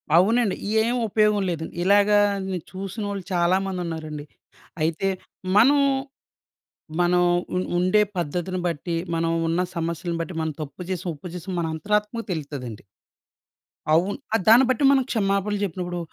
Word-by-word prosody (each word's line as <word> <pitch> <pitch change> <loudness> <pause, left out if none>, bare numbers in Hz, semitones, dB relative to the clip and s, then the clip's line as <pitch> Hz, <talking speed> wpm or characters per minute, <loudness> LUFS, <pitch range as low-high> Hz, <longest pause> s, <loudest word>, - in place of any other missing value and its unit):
అవునండి. 210 +3 +4 0.3
ఏం 235 +3 +1
ఉపయోగం 210 0 +2
లేదండి. 160 -2 -4
ఇలాగ 200 +2 +4 0.6
చూసినోళ్ళు 195 +1 -5
చాలా 175 +1 +3
మంది 190 -2 -3
ఉన్నారండి. 155 -3 -5 0.6
అయితే, 165 +4 0 0.5
మనం 275 +7 +6 1.2
మనం 180 0 +3 0.3
ఉ - - +1 0.2
ఉండే 185 +4 +3 0.2
పద్ధతిని 175 +3 -2
బట్టి 170 +1 -3 0.2
మనం 165 0 0 0.2
ఉన్న 165 +2 +1
సమస్యలను 170 +1 -2
బట్టి, 175 +2 -5
మనం 160 -1 -2
తప్పు 145 +2 -8
చేసిన, 185 -1 -3
ఒప్పు 150 +4 -10
చేసిన 180 +1 -6
మన 170 - 0
అంతరాత్మకు 210 +7 -1
తెలుత్తదండి. 140 -9 -5 1.1
అవును. 180 +5 +2 0.2
ఆ! - - +6
దాన్ని 235 +4 +8
బట్టి 255 +2 +1
మనం 270 -1 +4
క్షమాపణలు 200 -1 0
చెప్పినప్పుడు 175 -1 -3
180 Hz, 130 wpm, -24 LUFS, 165-205 Hz, 1.2 s, దాన్ని